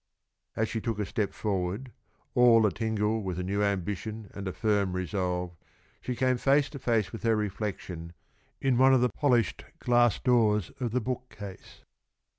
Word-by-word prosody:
As 110 - +1
she 110 - -3
took 115 -1 -2
a 105 - -1
step 105 +1 -1
forward, 100 +4 -2 0.4
all 120 -3 +6
a 105 - +3
tingle 110 +1 0
with 95 -3 -4
a 90 - -2
new 100 +3 -1
ambition 105 +2 -2
and 100 -1 -6
a - - -1
firm 100 -2 +1
resolve, 90 -1 -2 0.5
she 125 - -3
came 130 +1 +2
face 140 +3 +3
to 140 - -7
face 115 -6 +1
with 115 - -7
her 115 -1 +2
reflection 95 -5 -4 0.5
in 130 -3 +2
one 130 0 +7
of 125 - +3
the 125 - +3
polished 120 -5 +1
glass 120 -3 +3
doors 110 -6 +2
of 125 -2 -1
the 125 +3 0
bookcase. 110 -5 -7
110 Hz, 170 wpm, -28 LUFS, 100-120 Hz, 0.5 s, one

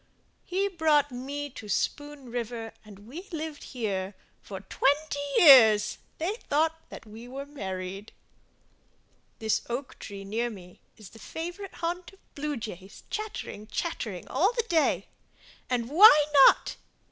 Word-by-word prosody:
He 385 +2 0
brought 310 -6 +2
me 280 +3 -5
to 220 -5 -10
Spoon 290 +3 -3
River 230 -1 -4
and 205 -1 -14
we 340 +11 -9
lived 315 -2 -6
here 200 -6 -3 0.3
For 195 -2 -8
twenty 285 +9 0 0.2
years—they 265 - +5
thought 320 +2 +1
that - - -10
we 220 +3 -11
were 270 +2 -7
married 195 -6 -6 1.3
This 220 -1 0
oak 255 +3 -5
tree 200 -1 -8
near 225 +5 -2
me 180 -5 -12 0.2
is 210 -4 -13
the 225 - -15
favorite 350 - -7
haunt 350 +2 -4
Of 390 - -25
blue 295 -1 -3
jays 200 -3 -9
chattering, 420 - -5
chattering 220 - -4
all 390 +6 +2
the 470 -2 -1
day. 325 -4 +2 0.6
And 240 -2 -1
why 305 - +8 0.2
not? - - +2
265 Hz, 135 wpm, -28 LUFS, 215-320 Hz, 1.3 s, why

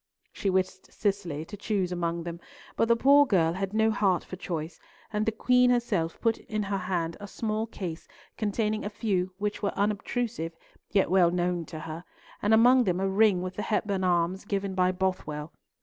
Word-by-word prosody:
She 200 - -1
wished 185 0 -1
Cicely 180 -7 -2
to 205 - -8
choose 200 -3 -1
among 170 -1 -2
them, 170 0 -6 0.4
but 225 - +2
the 235 - +5
poor 280 +4 +6
girl 170 -7 +3
had 195 +1 -3
no 220 +1 +3
heart 195 -4 +2
for - - -8
choice, 165 -3 -5 0.3
and 210 +1 0
the - - +3
Queen 250 +3 +3
herself 210 -9 0
put 230 -1 +1
in 215 -1 -3
her 200 0 -1
hand 175 -3 -2
a 205 - -7
small 215 +2 -2
case 175 -7 -6 0.3
containing 215 0 -1
a 205 - -2
few 195 -4 -1
which 205 +1 -2
were 200 - -2
unobtrusive, 205 -3 -1 0.4
yet 195 -3 +2
well 185 -2 +5
known 175 -1 -1
to 155 -1 -8
her, 160 +2 -7 0.4
and 205 - +1
among 245 +3 +6
them 180 -2 +1
a 195 - +1
ring 195 -2 +3
with 185 0 -6
the - - -1
Hepburn 205 -3 -1
arms, 180 +1 +1
given 200 -1 -2
by 185 -1 +3
Bothwell. 180 -5 -3
195 Hz, 190 wpm, -28 LUFS, 175-215 Hz, 0.4 s, poor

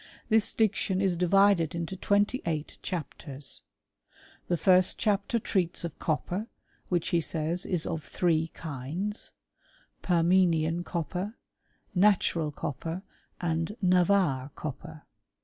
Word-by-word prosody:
This 220 -1 +3
diction 200 -3 +1
is 190 -2 +2
divided 180 -2 +4
into 170 +2 -3
twenty 205 +6 +1
eight 155 -2 -3
chapters: 145 -4 -4 0.9
the 175 - +1
first 185 +1 +4
chapter 210 +2 +1
treats 185 -6 -1
of 170 -3 -6
copper, 175 +7 -1 0.4
which, 175 -2 0
he 170 - +2
says, 165 +3 -2
is 175 -4 +1
of 160 -2 -3
three 165 -2 +1
kinds; 165 - -4 0.7
permenian 170 -1 +3
copper, 180 +5 -3 0.6
natural 180 -5 +3
copper, 160 +5 -4 0.4
and 165 +4 -1
Navarre 180 -7 +3
copper. 155 +1 -7
175 Hz, 110 wpm, -29 LUFS, 160-190 Hz, 0.9 s, divided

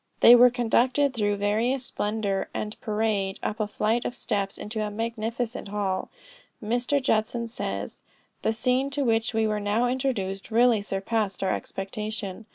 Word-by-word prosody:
They 235 - +10
were 245 +1 +8
conducted 250 +3 +2
through 205 -3 +1
various 225 +6 0
splendor 205 -3 -2
and 210 0 -3
parade, 210 -3 -1
up 215 - -2
a 215 - 0
flight 220 +3 0
of 245 - -3
steps 195 -3 -2
into 215 +1 -4
a 210 - -1
magnificent 230 +2 -3
hall. 195 -2 -2 0.5
Mr. 245 +6 0
Judson 235 -2 0
says 230 - -5 0.4
"The - - +1
scene 250 +4 +1
to 285 - +2
which 225 0 +1
we 225 0 +2
were 215 -1 0
now 210 +4 +1
introduced, 240 -7 -2
really 235 -1 +4
surpassed 195 0 -2
our 190 - +1
expectation. 210 +1 -5
220 Hz, 155 wpm, -26 LUFS, 205-240 Hz, 0.5 s, They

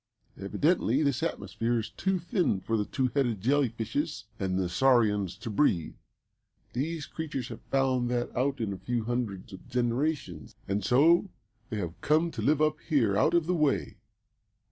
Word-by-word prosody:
Evidently 140 - +1
this 140 -2 +1
atmosphere 120 -7 -1
is 110 - -3
too 190 0 0
thin 175 - 0
for 110 +4 -2
the 105 -2 0
two 130 +3 0
headed 120 -7 +1
jelly 135 +5 +2
fishes 140 +8 -3
and 95 -1 -1
the 95 -1 0
saurians 105 -2 +2
to - - -9
breathe. 100 - +1 0.8
These 150 +5 -2
creatures 145 -6 -5
have 115 -1 -8
found 130 -2 +1
that 120 0 -2
out 135 +3 0
in 110 -4 -2
a 95 - -8
few 120 +4 -2
hundreds 110 -6 -3
of 95 - -11
generations, 120 - -1
and 100 +1 -1
so 165 - +4 0.4
they 110 - -3
have 85 -4 -5
come 160 +3 +2
to - - -5
live 150 +1 +3
up 155 - +2
here 115 -10 +3
out 155 +11 +3
of 170 -2 +3
the 180 - 0
way. 150 -5 0
125 Hz, 170 wpm, -29 LUFS, 105-150 Hz, 0.8 s, so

